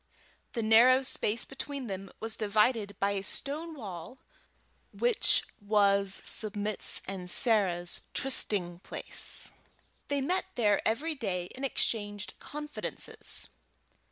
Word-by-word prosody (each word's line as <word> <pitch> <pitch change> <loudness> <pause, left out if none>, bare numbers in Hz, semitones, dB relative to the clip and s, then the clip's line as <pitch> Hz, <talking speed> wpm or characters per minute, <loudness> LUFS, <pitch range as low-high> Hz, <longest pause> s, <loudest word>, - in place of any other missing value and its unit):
The 230 - -3
narrow 245 +4 +5
space 230 -3 -1
between 275 0 -7
them 195 -2 -7
was 225 0 -3
divided 210 0 0
by 200 +1 +1
a 200 -1 -3
stone 305 - -4
wall 200 - -9 0.7
which 480 -2 +2 0.2
was 200 -1 +1
Submit's 210 -1 +5
and 185 -2 -6
Sarah's 185 -7 +1
trysting 190 -9 +2
place. - - +2 0.6
They 285 0 -1
met 355 +7 -1
there 210 -4 +2
every 290 +9 -1
day 185 - -4
and 265 - -9
exchanged 205 -6 -2
confidences. 300 0 -6
215 Hz, 110 wpm, -29 LUFS, 200-265 Hz, 0.7 s, narrow